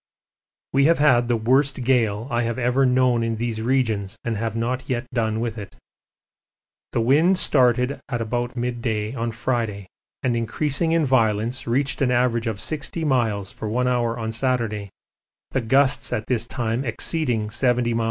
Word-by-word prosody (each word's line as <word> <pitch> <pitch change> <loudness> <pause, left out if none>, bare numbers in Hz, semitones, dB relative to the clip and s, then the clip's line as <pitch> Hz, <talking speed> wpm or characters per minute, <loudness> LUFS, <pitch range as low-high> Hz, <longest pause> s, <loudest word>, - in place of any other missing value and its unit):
We 140 +1 +4
have 165 +2 +4
had 130 -5 +4
the 120 - +2
worst 130 +3 +1
gale 115 -3 +1
I 120 0 +1
have 115 0 -2
ever 130 +2 +2
known 125 -2 +3
in 115 0 -1
these 115 -1 -3
regions 110 -6 0
and 115 -1 -2
have 110 +1 -3
not 125 +2 -2
yet 125 0 -1
done 110 -2 0
with 115 -1 -3
it. 100 - -9 1.2
The 115 - 0
wind 155 +10 +4
started 125 -3 +2
at 120 -3 -2
about 120 +2 -2
mid 120 -1 -3
day 110 -1 -2
on 120 -2 -2
Friday, 115 -4 -2 0.4
and 125 -3 +1
increasing 140 +8 0
in 165 -2 +2
violence 115 -1 +1
reached 135 +5 0
an 135 - +3
average 120 -2 +1
of 110 -3 -3
60 155 +4 -2
miles 110 -8 0
for 110 - -6
one 125 +3 0
hour 120 -2 0
on 110 -1 -3
Saturday, 115 -4 -1 0.6
the 130 - 0
gusts 135 +4 +2
at 110 - -2
this 120 -2 -1
time 120 +1 -2
exceeding 115 -3 -1
70 120 0 +1
m.p. 115 - 0
120 Hz, 170 wpm, -23 LUFS, 115-130 Hz, 1.2 s, We